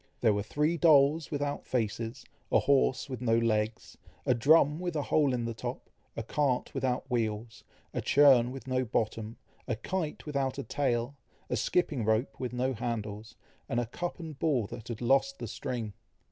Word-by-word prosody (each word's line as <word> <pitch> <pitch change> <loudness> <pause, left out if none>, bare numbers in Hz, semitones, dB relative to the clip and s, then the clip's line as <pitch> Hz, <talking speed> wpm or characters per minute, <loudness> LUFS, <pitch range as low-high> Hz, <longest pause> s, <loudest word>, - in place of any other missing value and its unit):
There 110 -3 +4
were 100 - 0
three 150 +10 0
dolls 150 -1 +5
without 145 -1 -3
faces, 115 -1 -2 0.3
a - - +6
horse 140 -1 +2
with 130 -3 -6
no 115 -2 +3
legs, 110 -1 -1 0.3
a 130 - +4
drum 150 +5 +4
with 175 -2 -3
a 150 - 0
hole 145 -2 +2
in 120 -2 -1
the 115 - -3
top, 110 - -6 0.3
a 115 - -2
cart 130 +2 0
without 130 0 -1
wheels, 110 -2 -2 0.3
a - - -1
churn 135 -4 +6
with 135 +1 -8
no 130 0 0
bottom, 110 -1 -2 0.3
a 120 - 0
kite 165 +4 -3
without 140 -3 -1
a 140 - -3
tale, 130 -2 -1 0.4
a - - +2
skipping 155 -9 0
rope 110 +2 0
with 125 -2 -3
no 125 +2 0
handles, 110 -2 -4 0.3
and 120 - +1
a 120 - 0
cup 175 +11 -5
and 160 -5 -8
ball 140 -9 +1
that 110 +3 -9
had 115 -1 -6
lost 135 - +2
the - - -5
string. 115 -5 -4
125 Hz, 180 wpm, -30 LUFS, 115-145 Hz, 0.4 s, a